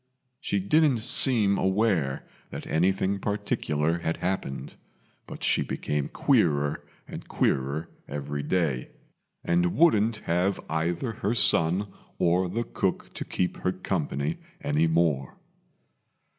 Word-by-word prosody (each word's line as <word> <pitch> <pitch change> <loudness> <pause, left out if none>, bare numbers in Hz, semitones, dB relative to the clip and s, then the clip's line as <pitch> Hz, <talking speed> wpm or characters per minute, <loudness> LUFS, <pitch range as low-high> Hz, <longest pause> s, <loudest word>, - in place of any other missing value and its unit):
She 100 - -1
didn't 145 +7 +3
seem 110 -4 +3
aware 95 -8 +1 0.2
that - - -7
anything 95 +4 +1
particular 85 -6 -1
had 80 -1 -2
happened, 70 -7 -3 0.5
but - - -9
she - - +2
became 75 -1 -2
queerer 75 - +1 0.2
and - - -8
queerer 70 +5 0 0.2
every 70 0 -4
day, 75 -5 -1 0.5
and 85 0 +1
wouldn't 115 -9 +4
have 90 +4 +1
either 85 +8 -1
her 105 +1 -2
son 90 -1 +3 0.3
or 90 +1 +2
the 115 +6 -1
cook - - -2
to - - -4
keep 90 - -2
her - - 0
company 70 +4 -2 0.2
any 75 +3 +2
more. 80 -5 +1
85 Hz, 115 wpm, -27 LUFS, 75-100 Hz, 0.5 s, wouldn't